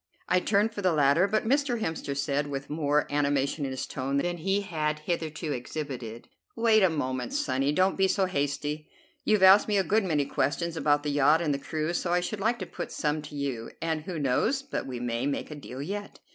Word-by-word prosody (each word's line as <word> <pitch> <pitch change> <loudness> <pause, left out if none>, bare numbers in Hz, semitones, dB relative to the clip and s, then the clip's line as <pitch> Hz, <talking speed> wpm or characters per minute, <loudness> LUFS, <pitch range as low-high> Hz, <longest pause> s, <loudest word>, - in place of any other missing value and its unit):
I 180 - +3
turned 210 +3 +1
for 205 - -4
the 185 -3 +2
ladder, 150 +5 +4
but 215 +2 0
Mr. 270 -2 +1
Hemster 160 -7 -3
said, 145 0 0
with 140 0 -5
more 150 -1 +2
of - - -11
animation 145 0 +1
in - - -2
his 130 0 -3
tone 135 +1 -2
than 175 +5 -1
he 195 +4 0
had 155 -5 -2
hitherto 155 -1 -3
exhibited: 125 -3 -6 0.3
"Wait 225 -2 +4
a 190 - +5
moment, 130 - -2
sonny; 145 - +1
don't 185 +5 +2
be 190 0 +4
so 190 0 +2
hasty. 145 -2 -2 0.4
You've 210 -3 +3
asked 190 +2 +8
me 210 -1 +2
a 195 - +3
good 215 +3 +2
many 155 -6 +1
questions 165 +5 -1
about 145 -2 +2
the 150 - -1
yacht 145 +2 +4
and 155 -4 0
the 140 - -2
crew, 155 +3 -2
so 175 0 -1
I 175 - +3
should 200 +4 -4
like 225 +4 +1
to 185 - -5
put - - -6
some 150 0 -1
to 150 - -10
you, 135 -5 -3
and 160 -1 -1
who 170 +2 -5
knows 150 - +1
but 275 - -4
we 125 -2 -5
may 120 +2 -1
make 145 - -3
a - - -5
deal 140 -2 -7
yet. 205 +5 -6
155 Hz, 225 wpm, -28 LUFS, 140-190 Hz, 0.4 s, asked